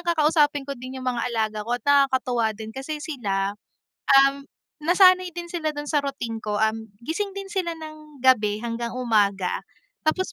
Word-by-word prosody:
kakausapin 305 -4 +2
ko 280 - -4
din 255 0 -8
'yung 255 - -8
mga 250 -1 0
alaga 220 -2 -1
ko 235 +3 -1
at - - -15
nakakatuwa 260 -6 +2
din 220 0 -8
kasi 270 +5 -5
sila, 200 - -2 0.7
um, 275 0 0 0.4
nasanay 365 +3 +5
din 345 0 -4
sila 315 -3 -2
dun 290 - -4
sa 295 -1 +2
routine 255 -5 -4
ko. 210 -1 -2
Um, 220 +1 0 0.2
gising 390 - -3
din 395 0 -6
sila 350 -4 -2
ng 305 -3 -11
gabi 215 -4 +3
hanggang 235 +1 -3
umaga 205 -6 +1 0.4
tapos 370 +5 0
265 Hz, 170 wpm, -24 LUFS, 225-310 Hz, 0.7 s, nasanay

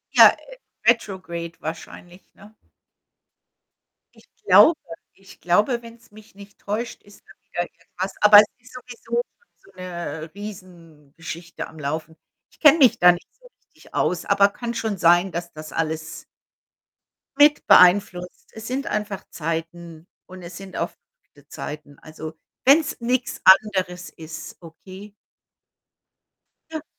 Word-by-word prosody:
Ja, - - +8 0.5
retrograde 185 -7 -1
wahrscheinlich, 175 +3 -9
ne? 210 +2 -17 1.6
Ich - - -22 0.2
glaube 335 - +7 0.4
ich 195 -1 -18
glaube, 210 +7 +1
wenn 230 0 -13
's - - -25
mich 210 -1 -17
nicht 200 0 -15
täuscht, 220 +4 -5
ist 205 0 -19
mal - - -17
wieder - - -4
irgendwas. 185 +2 -8
Aber 210 0 +9
es 210 - +6
ist 250 +1 -19
sowieso 240 -1 -4 0.4
so - - -21
'ne, 170 -4 -7
Riesengeschichte 170 -4 -10
am 160 - -15
Laufen. 155 +3 -5 0.4
Ich - - -26
kenne 300 0 +7
mich 240 -4 +5
da 180 0 +7
nicht 175 0 -6
so - - -20
richtig - - -24
aus, 180 - -1
aber 200 0 +4
kann 235 +3 -6
schon 220 -3 -3
sein, 175 +2 +3
dass 170 0 -6
das 155 0 -10
alles 160 0 -4 1.1
mit 295 +1 +5
beeinflusst. 180 -1 +3
Es 220 0 -9
sind 265 +2 -3
einfach 205 -2 -4
Zeiten 165 +1 -6 0.2
und 185 0 -12
es 170 +1 -10
sind 195 -1 -10
auch - - -2 0.4
wilde - - -22
Zeiten. 145 -1 -8
Also 155 0 -9 0.3
wenn 290 +5 +6
's 280 - -6
nichts 250 +1 -2
anderes 185 -2 +3
ist, 160 0 -10
okay. 185 +5 -13 1.6
Ja. 315 -2 -5
185 Hz, 135 wpm, -22 LUFS, 165-215 Hz, 1.6 s, Aber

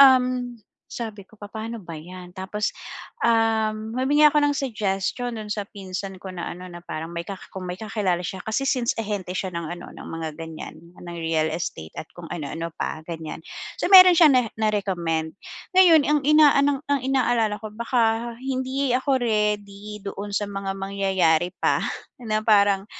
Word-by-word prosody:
um, 255 -2 +5 0.3
sabi 215 -4 -6
ko, - - -19
"Papa'no 220 +2 -6
ba 170 -1 -8
'yan?" 180 +2 -10
Tapos, 195 +3 -2 0.5
um, 220 -1 +2
humingi 290 +3 +3
ako 295 - +2
ng 290 0 +3
suggestion 225 -1 -2
do'n 215 -1 -7
sa 205 -2 -4
pinsan 195 -1 -6
ko 190 - -7
na 175 -1 -5
ano, 180 +1 -9
na 175 - -8
parang 160 +2 -5
may 170 0 -4
ka 195 - -4 0.2
kung 190 -1 -6
may 180 - -3
kakilala 200 -5 -1
siya 190 - -4
kasi 220 +5 0
since 255 -3 +1
ahente 205 -4 -3
siya 190 - -2
ng 170 -1 -4
ano, - - -10
ng - - -10
mga 165 -1 -4
ganiyan 160 -1 -7 0.2
ng 175 -1 -8
real 160 -1 0
estate 80 - -4
at 155 - -5
kung 175 -1 -9
ano 150 -5 -4
ano 165 +1 -4
pa 155 - -4
ganiyan, 160 -1 -6 0.3
so - - -1
meron 370 -1 +11
siyang 320 -2 +8
na 250 -2 +4
na-recommend. 180 -7 -1 0.4
Ngayon 335 -5 +8
ang 300 0 +3
inaan 285 -2 +5
ang 285 -1 +1
inaalala 240 -5 +1
ko 220 - -6
baka 235 0 +1
hindi 260 0 -1
ako 260 +1 +2
ready 210 -2 -1
doon 200 +1 -5
sa 205 - 0
mga 195 -1 -4
mangyayari 190 -4 +1
pa - - +2 0.4
na 215 -2 0
parang, 200 -2 +4
210 Hz, 170 wpm, -24 LUFS, 185-245 Hz, 0.5 s, meron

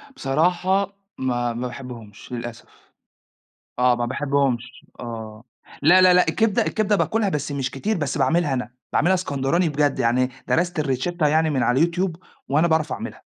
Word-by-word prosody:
بصراحة 180 - 0 0.2
ما 120 -2 -1
ما 125 +2 -3
باحبهمش 120 -5 -10
للأسف، 120 -1 -6 1.1
آه 125 0 +4
ما 120 0 -1
باحبهمش 135 -2 -1
آه، 110 -2 -7 0.4
لا، 175 +6 +6
لا، 185 -1 +7
لأ 180 0 +4
الكبدة 225 -3 +2
الكبدة 215 -1 +1
باكلها 215 0 +1
بس 150 -4 -3
مش 135 -2 -2
كتير، 205 +10 -2
بس 145 -4 -2
باعملها 165 -4 +2
أنا، 125 -2 -3 0.2
باعملها 175 +5 +3
إسكندراني 165 -1 0
بجد، 145 -1 0
يعني 125 +1 +2 0.2
درست 175 -1 +1
الRicetta 150 +4 0
يعني 160 +1 +2
من 135 -4 0
على 125 +4 +2
الYouTube 175 +1 -1 0.4
وأنا 155 +5 +3
باعرف 160 -3 +1
أعملها. - - -7
145 Hz, 155 wpm, -22 LUFS, 125-175 Hz, 1.1 s, لا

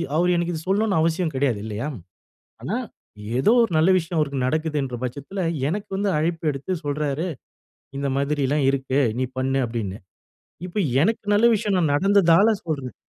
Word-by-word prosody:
அவர் 175 +3 +3
எனக்கு 170 0 -1
இத 160 - -4
சொல்லணும்னு 200 -1 +2
அவசியம் 165 0 0
கெடையாது, 130 -5 +1
இல்லையா? 110 +5 -4 0.8
ஆனா, - - -2 0.6
ஏதோ 205 - +4
ஒரு 230 - 0
நல்ல 160 +4 +4
விஷயம் 170 -1 -1
அவருக்கு 140 -4 0
நடக்குதுன்ற 150 -3 -1
பட்சத்துல, 140 +10 -5 0.3
எனக்கு 200 +6 -3
வந்து 200 0 0
அழைப்பு 165 +2 -1
எடுத்து 140 +6 -4
சொல்றாரு, 145 +2 -1 0.7
"இந்த 140 0 -1
மாதிரிலாம் 140 0 0
இருக்கு, 135 0 0 0.2
நீ 130 - +1
பண்ணு" 135 +1 +1
அப்படின்னு. 110 -4 -4 0.7
இப்ப 180 +3 -5 0.2
எனக்கு 220 +5 0
நல்ல 215 +3 +5
விஷயம் 210 -2 0
நான் 160 -5 +2
நடந்ததால 195 +3 +4
சொல்றேன். 140 -6 -3
155 Hz, 150 wpm, -23 LUFS, 135-185 Hz, 0.8 s, நல்ல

